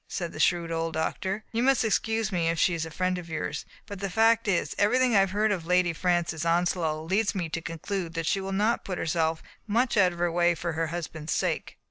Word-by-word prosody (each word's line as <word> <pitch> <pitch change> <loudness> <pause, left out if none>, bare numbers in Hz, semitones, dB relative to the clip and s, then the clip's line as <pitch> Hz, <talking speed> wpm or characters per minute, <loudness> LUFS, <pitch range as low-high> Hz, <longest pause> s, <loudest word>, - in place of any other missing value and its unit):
said 170 -2 -4
the - - -8
shrewd 170 -2 +2
old 165 0 -2
doctor. 190 +6 -2
"You 230 - 0
must 260 -2 +3
excuse 220 0 0
me 170 -3 +1
if 165 - 0
she 175 - +3
is 165 -1 -2
a - - -8
friend 185 +3 -1
of 170 -1 -10
yours, 160 - -3 0.2
but 200 -3 -8
the 200 0 -3
fact 225 +3 +3
is, 185 -4 +1
everything 245 +3 +3
I - - +7
have 195 -1 +3
heard 210 +2 +1
of 175 -5 -2
Lady 180 -1 +3
Francis 170 -2 0
Ons 170 +2 +2
low 155 -3 -2
leads 200 +6 0
me 175 -4 -2
to 165 - -3
conclude 165 +1 -4
that 165 0 -2
she 195 +5 +1
will 190 0 -4
not 210 +4 +1
put 185 -2 -4
herself 160 0 0 0.2
much 235 +3 +1
out 185 -3 +5
of 175 - -9
her 175 0 0
way 175 0 +3
for 170 0 -3
her 165 +1 -1
husband's 160 -2 -4
sake." - - -2
180 Hz, 240 wpm, -27 LUFS, 165-205 Hz, 0.2 s, I